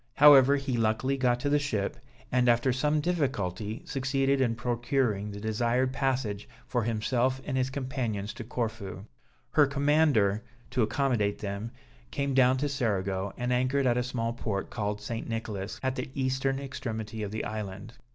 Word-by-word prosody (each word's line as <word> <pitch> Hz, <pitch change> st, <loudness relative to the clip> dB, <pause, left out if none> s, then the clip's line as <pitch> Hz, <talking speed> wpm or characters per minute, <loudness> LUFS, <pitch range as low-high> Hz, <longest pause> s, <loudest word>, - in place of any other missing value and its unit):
However, 140 Hz, -2 st, +8 dB
he 135 Hz, -3 st, -1 dB
luckily 115 Hz, +4 st, +1 dB
got 125 Hz, -2 st, +2 dB
to 145 Hz, -, 0 dB
the 145 Hz, +1 st, +3 dB
ship, 110 Hz, -9 st, -1 dB, 0.4 s
and 125 Hz, -1 st, +3 dB
after 120 Hz, +2 st, +3 dB
some 150 Hz, +4 st, +1 dB
difficulty, 110 Hz, -, -2 dB
succeeded 135 Hz, 0 st, +1 dB
in 120 Hz, -3 st, +2 dB
procuring 120 Hz, -3 st, 0 dB
the 100 Hz, 0 st, -7 dB
desired 120 Hz, +4 st, 0 dB
passage 125 Hz, -8 st, -1 dB, 0.2 s
for 120 Hz, -, 0 dB
himself 120 Hz, +4 st, 0 dB
and 135 Hz, -, -2 dB
his 130 Hz, 0 st, +1 dB
companions 125 Hz, -7 st, -3 dB
to 120 Hz, -, -7 dB
Corfu. 110 Hz, -5 st, -4 dB, 0.5 s
Her 145 Hz, -2 st, +5 dB
commander, 140 Hz, -7 st, +3 dB, 0.3 s
to 125 Hz, -, +1 dB
accommodate 110 Hz, -2 st, +1 dB
them, 100 Hz, +2 st, -4 dB, 0.4 s
came 140 Hz, -, -1 dB
down 130 Hz, 0 st, +5 dB
to 145 Hz, +3 st, 0 dB
Cerigo, 100 Hz, -7 st, -1 dB
and 125 Hz, 0 st, 0 dB
anchored 130 Hz, +2 st, +1 dB
at 120 Hz, -2 st, +3 dB
a 125 Hz, -, +2 dB
small 120 Hz, -2 st, -2 dB
port 105 Hz, -4 st, -3 dB
called 105 Hz, -2 st, -2 dB
St. 115 Hz, +2 st, -5 dB
Nicholas, 110 Hz, 0 st, -4 dB
at 130 Hz, 0 st, 0 dB
the -, -, -4 dB
eastern 135 Hz, 0 st, 0 dB
extremity 115 Hz, -5 st, -5 dB
of 105 Hz, -, -3 dB
the 110 Hz, +2 st, -4 dB
island. 105 Hz, +1 st, -5 dB
120 Hz, 160 wpm, -29 LUFS, 110-135 Hz, 0.5 s, However